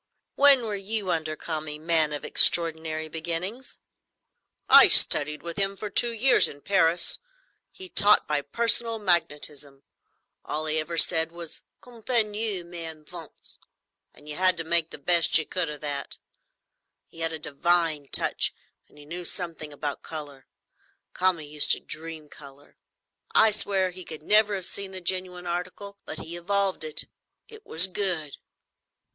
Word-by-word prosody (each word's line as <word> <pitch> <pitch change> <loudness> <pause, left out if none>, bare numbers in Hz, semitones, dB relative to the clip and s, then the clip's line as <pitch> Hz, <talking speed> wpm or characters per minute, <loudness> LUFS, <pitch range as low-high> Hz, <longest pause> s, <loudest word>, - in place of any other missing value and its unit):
"When 280 -3 +5
were 215 -2 -3
you 200 -1 -1
under 155 -1 -3
Kami, 155 -2 -6
man 160 -1 0
of 145 - -6
extraordinary 160 -2 +2
beginnings?" 170 +10 -5 0.9
"I - - +9
studied 150 +1 +5
with 170 -1 -5
him 195 0 0
for 205 +1 -7
two 235 +4 +3
years 235 +4 +4
in 145 - -12
Paris. 170 -2 +2 0.5
He 375 - -9
taught 210 - +3
by 150 -1 0
personal 230 +8 +1
magnetism. 150 -7 -1 0.6
All 155 +1 -4
he 155 0 +3
ever 165 +2 -4
said 160 0 +4
was, 170 -1 -5 0.2
'Continuez, 220 -5 -1
mes 170 -1 -8
enfants,' 160 +1 -10 0.5
and 145 - -18
you 150 - -3
had 185 -1 +4
to 165 - -3
make 165 0 0
the - - -8
best 170 +3 +3
you 160 - 0
could 180 -4 -2
of 150 -1 -8
that. 145 -2 -5 0.9
He 165 - -15
had 165 0 -1
a 160 - -4
divine 155 0 0
touch, - - +1 0.3
and - - -24
he 145 - -14
knew 175 +4 -7
something 165 -4 -3
about 145 0 -6
colour. 145 -4 -8 0.7
Kami 180 -4 0
used 150 0 -1
to - - -3
dream 160 -1 -6
colour; 145 -1 -15 0.6
I 220 0 +5
swear 195 -3 +1
he 185 +1 -10
could 155 -3 -10
never 210 +2 +3
have 190 -2 -1
seen 195 -1 -2
the 185 - -6
genuine 180 0 -2
article; 180 +3 -5
but - - -7
he 170 - -7
evolved 195 0 -1
it; 155 -1 -2
and - - -23 0.4
it 440 -1 -13
was 165 +3 +4
good." 180 -6 -2
170 Hz, 155 wpm, -25 LUFS, 155-195 Hz, 0.9 s, I